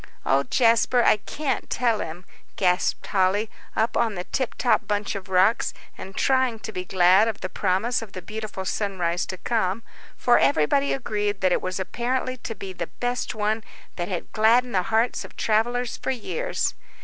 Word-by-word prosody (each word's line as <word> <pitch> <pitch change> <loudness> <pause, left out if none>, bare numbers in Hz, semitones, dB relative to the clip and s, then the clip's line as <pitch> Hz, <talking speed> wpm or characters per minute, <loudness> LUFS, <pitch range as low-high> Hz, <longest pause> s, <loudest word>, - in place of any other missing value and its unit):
"Oh, 135 +1 +3
Jasper, 235 - +3
I - - +5
can't 275 +7 -3
tell 235 -3 +1
him," 175 +3 -6 0.3
gasped 180 -2 +1
Polly, 200 +3 +1 0.2
up 225 +2 +1
on 225 -3 +1
the 180 - -4
tiptop 250 +2 0
bunch 205 -1 -1
of 195 -1 -7
rocks, 190 +5 +3 0.2
and 190 0 -9
trying 260 -3 +2
to 220 - -6
be 180 -3 -4
glad 185 +3 +5
of 225 - -3
the 185 - -3
promise 200 +7 0
of 220 -4 -10
the 185 - -6
beautiful 215 -2 -6
sunrise 180 -4 -1
to 185 - -5
come, 220 0 -1 0.3
for 245 - +4
everybody 150 - +3
agreed 210 -5 -1
that 185 -1 +3
it - - +2
was 185 +1 -3
apparently 250 +7 -2
to 230 -2 -6
be 190 -1 -7
the 175 -2 -4
best 245 -2 -2
one 215 +1 0 0.3
that 175 -1 -3
had 180 -4 -4
gladdened 235 +3 +3
the 185 - +3
hearts 225 +2 +1
of - - -13
travellers 240 +3 0
for - - -4
years. 470 - -1
215 Hz, 175 wpm, -24 LUFS, 185-235 Hz, 0.3 s, I